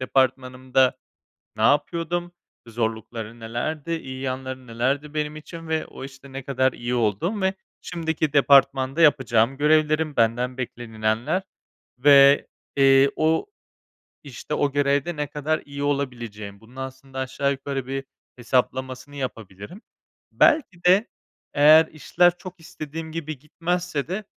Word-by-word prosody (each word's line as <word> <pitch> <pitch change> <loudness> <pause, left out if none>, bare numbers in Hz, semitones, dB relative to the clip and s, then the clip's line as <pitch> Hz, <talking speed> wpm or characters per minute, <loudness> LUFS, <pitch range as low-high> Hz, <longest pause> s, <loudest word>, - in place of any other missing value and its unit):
departmanımda, 130 0 +1 0.6
ne 110 - -3
yapıyordum, 170 +6 +1 0.3
zorlukları 115 0 -4
nelerdi, 140 +8 -4
iyi 130 -5 -6
yanları 130 0 -5
nelerdi 135 +6 -2
benim 150 0 -2
için 165 +1 -10
ve 160 0 -1
o - - -10
işte 135 0 -12
ne 135 0 -6
kadar 130 -1 +1
iyi 120 +1 -4
olduğum 120 - 0
ve 190 0 +1 0.3
şimdiki 160 -3 -2
departmanda 140 0 +4
yapacağım 135 -5 +3
görevlerim, 155 0 +2
benden 120 +3 +1
beklenilenler 115 - -2 0.6
ve, 140 +1 +6 0.3
eee, 135 0 +5
o 160 - +1 0.8
işte, 140 +2 -6
o 145 -2 0
görevde 145 +3 +1
ne 150 0 -2
kadar 150 +2 -1
iyi 140 0 -7
olabileceğim. 120 -8 -3
Bunun 115 +3 -18
aslında 130 0 -8
aşağı 130 +1 -1
yukarı 135 -1 -4
bir 135 0 -4 0.3
hesaplamasını 130 +2 -2
yapabilirim. 115 - -7 0.5
Belki 290 - +2
de 190 +6 +5 0.5
eğer 155 +2 +7
işler 175 +3 +1
çok 180 0 -10
istediğim 160 0 -8
gibi 155 -3 -5
gitmezse 165 +1 -3
de 195 +3 -3
140 Hz, 125 wpm, -24 LUFS, 130-155 Hz, 0.8 s, eğer